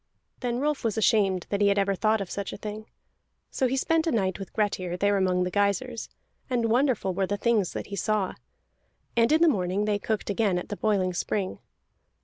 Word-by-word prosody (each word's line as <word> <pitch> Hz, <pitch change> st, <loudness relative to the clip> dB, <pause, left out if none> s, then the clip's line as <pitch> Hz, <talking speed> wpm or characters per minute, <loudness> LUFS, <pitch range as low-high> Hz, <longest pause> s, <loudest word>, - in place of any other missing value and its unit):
Then 245 Hz, -1 st, -2 dB
Rolf 295 Hz, +1 st, -1 dB
was 225 Hz, -2 st, -1 dB
ashamed 195 Hz, -4 st, +2 dB
that 200 Hz, 0 st, 0 dB
he 205 Hz, -, +5 dB
had 200 Hz, 0 st, +3 dB
ever 200 Hz, 0 st, +2 dB
thought 215 Hz, +2 st, +1 dB
of 195 Hz, -, -5 dB
such 200 Hz, -1 st, -4 dB
a -, -, -7 dB
thing. 215 Hz, +1 st, -7 dB, 0.6 s
So 260 Hz, -, +1 dB
he 265 Hz, +2 st, -1 dB
spent 325 Hz, +4 st, +1 dB
a -, -, +2 dB
night 190 Hz, -5 st, 0 dB
with 195 Hz, -, -7 dB
Grettir, 185 Hz, -4 st, -1 dB
there 205 Hz, +2 st, +2 dB
among 185 Hz, -2 st, +2 dB
the 180 Hz, -, -2 dB
geysirs, 210 Hz, +5 st, 0 dB, 0.4 s
and 235 Hz, -3 st, +1 dB
wonderful 245 Hz, -6 st, +2 dB
were 190 Hz, +1 st, 0 dB
the 205 Hz, -, -1 dB
things 215 Hz, -4 st, +1 dB
that -, -, -4 dB
he -, -, -1 dB
saw. 200 Hz, 0 st, 0 dB, 0.8 s
And 230 Hz, +2 st, +3 dB
in 320 Hz, +2 st, +5 dB
the -, -, +6 dB
morning 195 Hz, -, +1 dB
they 210 Hz, -1 st, 0 dB
cooked 210 Hz, 0 st, -2 dB
again 200 Hz, -3 st, +1 dB
at 180 Hz, -, -5 dB
the 205 Hz, -, -3 dB
boiling 195 Hz, -4 st, +1 dB
spring. 190 Hz, +2 st, -2 dB
205 Hz, 210 wpm, -27 LUFS, 195-230 Hz, 0.8 s, the